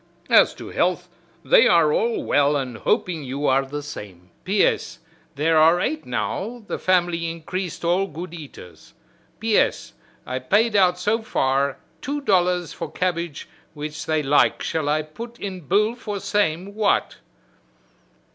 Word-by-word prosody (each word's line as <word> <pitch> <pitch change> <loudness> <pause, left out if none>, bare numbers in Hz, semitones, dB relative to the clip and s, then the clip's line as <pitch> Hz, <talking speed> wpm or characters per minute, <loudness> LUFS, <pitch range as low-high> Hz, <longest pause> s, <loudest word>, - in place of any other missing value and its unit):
As - - +6
to - - -9
health - - 0 0.4
they - - +6
are 455 - +4
all 465 -7 0
well 145 - +2
and 130 -5 -3
hoping 165 -5 0
you 140 +2 -4
are 135 0 +3
the 145 +2 -6
same. 95 -10 -10
P. 195 +2 +2
S. - - -1 0.4
There 160 +3 +2
are 165 +3 +5
eight 310 +10 -2
now 240 0 -3
the - - -4
family 175 -2 +1
increased 170 +1 -5
all 180 +3 +2
good 170 +1 -8
eaters. 135 - -12 0.4
P. 220 -1 +1
S. - - -1 0.3
I 130 +1 -3
paid 210 - +2
out 180 -3 +4
so 210 +5 0
far 135 -8 0 0.2
two 290 +2 -3
dollars 180 - +1
for 165 -3 -6
cabbage 170 -4 -3 0.3
which 150 +1 -6
they 155 -1 +1
like 145 +1 +3
shall 155 -3 -1
I 155 +1 +1
put 230 +10 -10
in 185 -6 -6
bill 210 +4 +2
for 210 -4 -5
same 200 -2 -1
what?" 210 -1 +1
175 Hz, 155 wpm, -23 LUFS, 145-205 Hz, 0.4 s, As